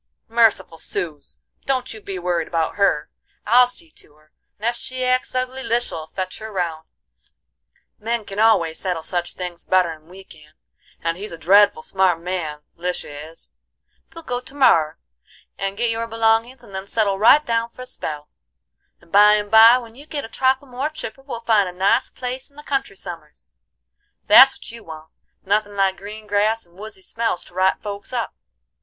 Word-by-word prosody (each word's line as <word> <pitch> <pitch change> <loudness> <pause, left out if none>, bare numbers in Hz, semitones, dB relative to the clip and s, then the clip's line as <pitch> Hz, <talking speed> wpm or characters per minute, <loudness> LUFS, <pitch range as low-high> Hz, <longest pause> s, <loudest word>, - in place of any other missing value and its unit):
"Merciful, 220 -8 +2
suz! 155 - -4 0.3
don't 260 -3 -1
you 220 - -11
be 195 -2 -6
worried 175 -2 -1
about 165 -2 -1
her. 200 -7 +1 0.3
I'll 245 +3 +6
see 325 +6 -8
to 150 - -19
her, 155 0 -27 0.3
and 215 - -7
ef 235 +1 +1
she 255 +1 -3
acts 255 0 0
ugly 255 +1 -2
Lisha'll 235 -11 -2
fetch 185 +3 -5
her 220 0 -8
round; 170 -5 -3 1.1
men 230 0 -2
can 195 +1 -6
always 190 -8 +3
settle 180 -4 -2
such 175 0 0
things 180 -2 -6
better'n 165 -4 0
we 190 +2 -13
can, 150 -4 -18 0.5
and 165 0 -1
he's 205 +1 -6
a 165 - -7
dreadful 195 0 +4
smart 190 -3 +2
man 165 -4 -4
Lisha 180 -2 -4 0.2
is. 165 - -13 0.6
We'll 330 - -11
go 245 -4 -3
to 270 +2 -13
morrer 165 - +4 0.6
and 195 0 -3
get 235 0 +1
your 230 0 -2
belongins, 225 +2 +1
and 200 - -15
then 190 +1 -5
settle 200 -3 0
right 285 +8 +6
down 230 0 0
for 255 - -10
a - - -9
spell; 150 -12 -6 0.7
and 170 - -23
by 210 +1 +7
an' 205 -1 -2
by 225 +2 +9
when 235 -3 -9
you 285 +5 -13
git 295 -5 -3
a - - -11
trifle 265 +2 +1
more 260 +4 -3
chipper 270 -4 -8
we'll 270 -4 -7
find 215 -5 +3
a - - -7
nice 190 +2 +2
place 255 +2 -5
in 280 - -27
the 295 - -11
country 270 -8 -2
some'rs. 165 -5 -9 0.7
That's 265 +5 +8
what - - -10
you 230 0 -11
want; 160 0 -11 0.3
nothin' 205 +1 0
like 195 -1 +1
green 215 +2 -9
grass 210 +2 +1
and 170 0 -25
woodsy 205 -1 -9
smells 230 -4 -2
to - - -18
right 185 +1 +2
folks 205 +1 -6
up. 240 -3 -2
205 Hz, 185 wpm, -21 LUFS, 175-235 Hz, 1.1 s, by